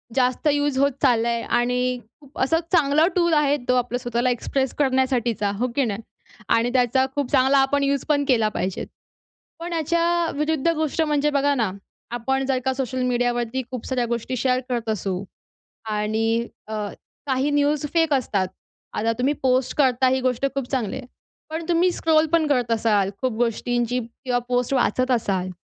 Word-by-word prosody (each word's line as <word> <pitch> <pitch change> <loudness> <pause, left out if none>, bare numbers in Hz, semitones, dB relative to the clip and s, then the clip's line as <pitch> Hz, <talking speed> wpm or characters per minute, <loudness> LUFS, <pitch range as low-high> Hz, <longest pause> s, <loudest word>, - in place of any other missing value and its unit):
जास्त 255 +3 +1
युज 290 -1 0
होत 280 +1 +3
चाललंय 235 -3 +2 0.2
आणि 250 +1 0 0.2
खूप 280 -1 -13
असा 325 +5 +2
चांगला 310 -3 +4
टूल 340 -2 +3
आहे 295 -1 +3
तो 250 - +3
आपला 245 0 0
स्वतःला 240 0 -1
एक्सप्रेस 265 +2 -1
करण्यासाठीचा, 255 -6 +1
हो 245 +4 0
की 275 - +2
नाही? 210 -1 -3 0.5
आणि 230 +1 +3
त्याचा 255 +1 +3
खूप 285 -3 -2
चांगला 270 0 +4
आपण 275 +1 +2
यूज 280 -1 0
पण 285 -1 +2
केला 225 -5 +3
पाहिजे. 190 -3 -3 0.8
पण 345 +1 -5
याच्या 335 +1 +1
विरुद्ध 305 0 0
गोष्ट 315 0 0
म्हणजे 295 -1 +1
बघा 285 0 +2
ना 225 -7 0 0.4
आपण 265 +3 -1
जर 265 -1 +1
का 265 - +1
सोशल 255 -1 -2
मीडिया 245 -1 +1
वरती 240 +2 -2
खूप 250 -3 -6
साऱ्या 255 -2 0
गोष्टी 235 +2 -3
शेअर 255 +1 +1
करत 235 -3 -2
असू, 195 -3 -2 0.7
आणि 220 +2 0 0.2
अ, 220 - -6 0.5
काही 265 +1 +1
न्यूज 290 0 +1
फेक 325 -2 +3
असतात, 200 -8 0 0.4
आता 225 +1 0
तुम्ही 270 +4 +1
पोस्ट 255 -1 +1
करता 260 -2 +3
ही 260 +1 +1
गोष्ट 255 0 -1
खूप 275 -3 -3
चांगली 240 -7 -1
आहे 260 - -7 0.4
पण 320 +1 -4
तुम्ही 350 +1 +3
स्क्रोल 320 -2 +2
पण 330 -2 +3
करत 250 -5 +1
असाल 210 -4 +2
खूप 255 -1 +1
गोष्टींची 240 +1 0
किंवा 245 +2 -3
पोस्ट 245 +1 0
वाचत 255 0 +1
असाल 195 -6 0
255 Hz, 170 wpm, -23 LUFS, 240-285 Hz, 0.8 s, चांगला